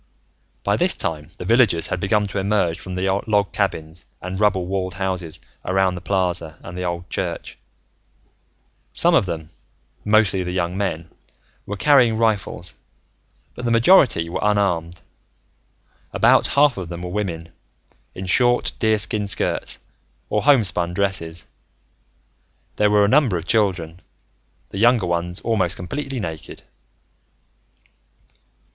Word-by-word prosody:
By - - +1
this - - +2
time, 75 -1 -3
the - - -7
villagers 115 -8 +3
had 95 - -2
begun 105 +3 +1
to 100 - -3
emerge 95 -4 0
from 95 -1 -7
the 90 +1 -1 0.2
log 100 -4 +1
cabins 80 +3 -3 0.2
and 90 +1 -5
rubble 100 -4 +2
walled 95 -1 -3
houses 90 -4 -3 0.2
around 95 0 +1
the 90 - -7
plaza 90 -5 0
and 90 - -9
the 90 - -5
old 85 0 -4
church. - - -4 1.4
Some 175 +1 +3
of 125 - +3
them, 80 -2 -5 0.5
mostly 105 -3 +3
the 90 - -4
young 90 -1 -1
men, 85 -4 -3 0.6
were 105 - -4
carrying 125 -2 +4
rifles, 105 -6 -1 0.8
but 125 - -9
the 120 - 0
majority 115 - +4
were 85 - -4
unarmed. 90 -5 0 1.1
About - - +4
half 145 -5 +5
of 90 -3 -5
them 85 0 -7
were 90 - -5
women, 85 -5 -3 0.7
in 95 - -6
short 120 +6 +2
deerskin 110 -2 +1
skirts 100 - -1 0.5
or 105 - +1
homespun 95 -11 +3
dresses. 90 -4 -2 1.3
There 105 - +3
were 105 0 +4
a - - +2
number 125 -6 +3
of 85 - -6
children, 90 -7 0 0.7
the 95 - -6
younger 120 -2 +4
ones 85 +1 -2
almost 95 -6 0
completely 135 +8 -5
naked. 80 -6 -7
95 Hz, 135 wpm, -21 LUFS, 85-105 Hz, 1.4 s, half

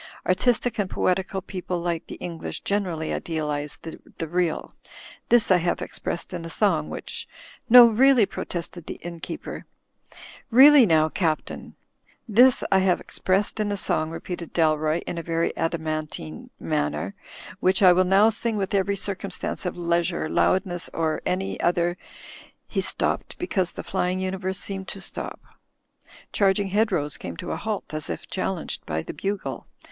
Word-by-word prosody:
Artistic 240 +5 +1
and 195 -2 0
poetical 190 +1 0
people 180 -2 -4
like 170 -1 -2
the - - -7
English 170 -2 -6
generally 180 -6 -1
idealize 150 -3 -3
the 165 0 -8
real. 175 0 -1 0.6
This 235 -4 +5
I 185 - +7
have 175 0 0
ex - - -6
pressed 170 - -3
in 175 -2 -4
a 165 - -6
song, 165 -5 +1
which - - -6
— - - -17
" 265 - -38
"No, 245 +1 +11
really," 240 +1 +5
protested 175 -2 -6
the - - -5
innkeeper, 170 -1 -7 0.8
"really 265 +1 +8
now. 155 -2 +4
Captain 160 -2 -2 0.2
— - - -37
" - - -38
"This 255 0 +7
I 190 - +5
have 185 -2 +2
expressed 195 +3 0
in 210 -1 0
a 200 - -1
song," 155 -4 0
repeated 170 0 -6
Dalroy, 155 0 +2
in 170 - -4
an 165 0 0
adamantine 155 - -3
manner, 75 +6 -1 0.5
"which 190 +2 +2
I 180 -1 +9
will 185 +1 +4
now 195 +4 +5
sing 230 0 -1
with 195 -1 -2
every 200 0 +2
circumstance 195 -1 -4
of 180 - -4
leisure, 170 -1 0
loudness, 175 +1 +1
or 160 -1 0
any 190 +1 -2
other—" 175 0 +1 0.7
He - - -1
stopped - - -1
because 190 - -1
the - - -7
flying 180 +1 -1
imiverse 190 0 -2
seemed 195 -1 -5
to 195 - -5
stop. 190 - -5 0.9
Charging 195 0 +2
hedgerows 185 -8 +1
came 85 -2 -7
to - - -5
a - - -1
halt, 215 -6 -4
as 155 -1 -3
if - - -5
chal 190 0 -2
lenged 165 - -5
by 80 0 -2
the - - -7
bugle. 195 0 -4
180 Hz, 160 wpm, -25 LUFS, 165-200 Hz, 0.9 s, No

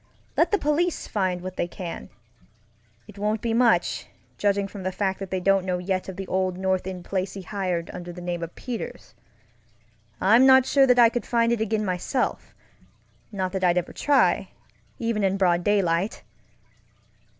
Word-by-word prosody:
Let - - +3
the 410 - +2
police 325 +2 0
find 185 -4 -1
what 185 0 -7
they - - 0
canŌĆöit 175 -1 -7 1.1
won't 210 +1 -1
be 230 -1 -1
much, 235 0 +2 0.3
judging 200 -1 +1
from 200 0 -9
the 185 0 -2
fact 190 0 -2
that 195 -1 -6
they 190 - -1
don't 195 +1 +2
know 180 -1 -1
yet 185 +1 -2
of 190 - -6
the 195 +1 -5
old 185 0 -1
North 190 -1 -1
End 180 -2 -6
place 190 -1 -2
he 195 - -7
hired 180 -4 -3
under 175 0 -7
the 175 - -10
name 175 -1 -4
of 170 0 -6
Peters. 245 -3 -7 1.1
I'm 225 +8 +5
not 265 -1 +7
sure 270 0 +4
that 250 -1 +4
I 235 -1 +7
could 240 +1 -4
find 235 -1 +2
it 235 -2 0
again 220 0 0
myselfŌĆönot 190 +7 -1 1.1
that 190 0 -3
I'd 175 -1 +3
ever 180 - -2
try, 290 -1 +2 0.5
even 230 -3 -1
in 195 0 +1
broad 175 -2 +2
daylight! 195 0 +1
195 Hz, 175 wpm, -25 LUFS, 180-225 Hz, 1.1 s, not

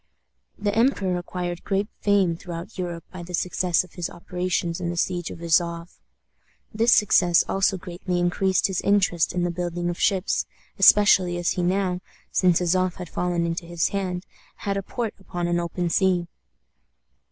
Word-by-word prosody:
The 205 0 -1
emperor 220 -6 +2
acquired 175 -1 -5
great 200 0 0
fame 195 -4 +2
throughout 170 +3 -8
Europe 175 -3 -4
by 185 - -7
the 175 +1 -4
success 180 0 +1
of 185 - -17
his 175 -2 -4
operations 180 -1 -3
in 170 - -2
the 175 - -4
siege 175 0 -1
of 170 - -9
Azof. 170 +1 0 0.7
This 230 +3 +3
success 180 -6 +5
also 195 0 +1
greatly 180 0 -4
increased 180 +2 +1
his 190 -2 0
interest 195 -5 +2
in 175 0 -1
the 175 - 0
building 175 0 -2
of 175 - -8
ships, 195 -2 +1 0.3
especially 190 -4 +6
as 175 0 0
he 180 - -1
now, 180 0 0 0.3
since 180 -3 +3
Azof 185 0 +1
had 180 -3 -8
fallen 175 -1 -1
into 170 0 -3
his 170 -1 0
hands, 185 -2 -3 0.3
had 200 -1 -3
a 195 - -1
port 225 +3 -4
upon 175 -2 -4
an 175 0 +1
open 175 +1 -2
sea. 180 0 +2
180 Hz, 165 wpm, -24 LUFS, 175-190 Hz, 0.7 s, especially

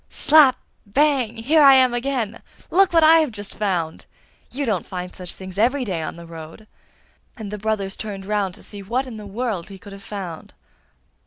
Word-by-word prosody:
'Slap! 290 -4 +5 0.3
bang! 260 0 +1
here 280 +8 +3
I 275 -2 +8
am 255 -2 +5
again! 240 -3 -2 0.3
Look 390 0 +4
what 330 -2 +4
I 325 +1 +7
have 310 -3 +1
just 205 -2 -7
found! 180 -6 -2 0.4
You 280 +2 -2
don't 210 -7 0
find 180 -1 -6
such 180 -1 -8
things 190 0 -8
every 255 +4 +2
day 180 -6 -3
on 155 - -5
the 170 0 -11
road!' 165 +5 -11 0.7
And 215 -3 -7
the 210 - -5
brothers 205 -2 -2
turned 200 -3 -6
round 200 -3 -1
to - - -14
see 205 -1 -9
what 240 +7 -2
in 245 -4 -8
the 210 -1 -9
world 210 -4 -3
he 195 - -10
could 200 0 -12
have 195 - -11
found. 190 -5 -8
210 Hz, 195 wpm, -22 LUFS, 195-255 Hz, 0.7 s, I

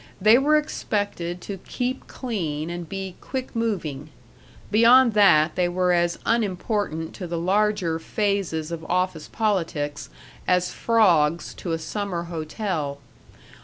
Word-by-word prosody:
They 215 +5 +6
were 300 +3 +4
expected 205 - -2
to 195 0 -6
keep 255 +6 -4
clean 170 - -3
and 175 -1 -6
be 195 -2 -5
quick 260 -1 -5
moving; 165 -11 -2 0.6
beyond 235 +2 +6
that 170 -7 +5
they 180 -1 +1
were 180 0 +1
as 175 0 +1
unimportant 205 -6 -1
to 180 - -6
the 170 0 -3
larger 190 -2 +1
phases 185 -4 -1
of 165 -1 -5
office 180 -3 -1
politics 165 -9 -1 0.4
as 180 0 +2
frogs 170 -9 +2
to 175 - -6
a 165 - 0
summer 175 +1 -3
hotel. 160 -2 -3
180 Hz, 130 wpm, -24 LUFS, 165-210 Hz, 0.6 s, They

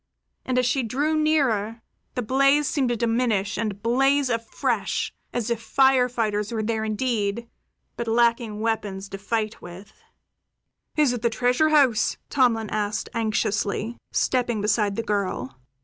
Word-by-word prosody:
And 255 -1 -1
as 250 - +3
she 255 +2 +1
drew 280 +7 0
nearer, 245 -8 +1 0.3
the 250 - -1
blaze 275 +4 +3
seemed 265 -4 0
to 240 - +1
diminish 225 -3 0
and 205 -2 -3
blaze 270 +3 +2
afresh 230 -1 -1 0.2
as 240 -1 -2
if 230 -1 -1
fire 265 +1 +3
fighters 215 -3 -1
were 220 -2 -2
there 220 0 -1
indeed, 220 0 -1 0.5
but 235 - -3
lacking 230 -2 +1
weapons 205 -3 -2
to 195 - -7
fight 215 +1 -2
with. 185 +4 -11 1.0
"Is 295 -5 +3
it 245 - -4
the 235 - +2
treasure 250 +6 +2
house?" 265 -8 +3
Tomlin 235 -6 +2
asked 210 0 -2
anxiously, 215 0 -1 0.2
stepping 245 -3 0
beside 205 -1 +1
the 230 - -2
girl. 200 - -2
230 Hz, 145 wpm, -24 LUFS, 210-250 Hz, 1.0 s, as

